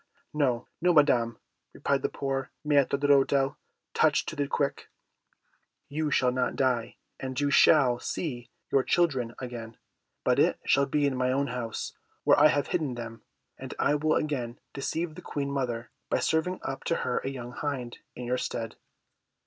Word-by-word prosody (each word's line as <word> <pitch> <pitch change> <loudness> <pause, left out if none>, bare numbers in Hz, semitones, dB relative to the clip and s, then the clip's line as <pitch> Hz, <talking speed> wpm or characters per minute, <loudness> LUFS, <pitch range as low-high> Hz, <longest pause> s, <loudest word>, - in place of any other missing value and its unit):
"No, 130 -6 +1
no, 180 +1 +4
Madam!" 120 -6 +4 0.4
replied - - 0
the - - 0
poor 135 -1 -3 0.2
Maître 140 -2 +3
d'Hôtel, 140 0 +3 0.4
touched - - +3
to - - -7
the 145 -1 -1
quick, 140 0 -1 1.0
"you 155 +1 -1
shall 125 -3 +3
not 125 0 0
die, 125 -3 0 0.2
and 130 0 -4
you 145 0 +1
shall 130 -6 +5
see 120 -8 -4 0.2
your 135 - +4
children 130 -7 +1
again, 120 -3 -7 0.5
but - - +3
it - - +3
shall 140 0 +3
be 145 +1 +1
in 140 -2 +1
my 130 0 +1
own 140 +2 +1
house, 120 -3 -4 0.3
where - - +5
I 150 - +8
have 145 -2 +1
hidden 150 -8 -1
them; 115 -1 -7 0.4
and - - -7
I 145 - +2
will 155 +1 +2
again 125 -6 -2 0.2
deceive 160 +4 -2
the 180 - -10
Queen 140 -4 -3
mother 120 -4 -2 0.2
by - - +2
serving 165 +3 0
up 135 - -4
to 170 - +1
her 125 - 0
a - - -6
young 125 -3 -6
hind 125 -3 -4 0.2
in 125 - -6
your 125 +1 0
stead." 115 -1 -4
135 Hz, 170 wpm, -28 LUFS, 125-145 Hz, 1.0 s, I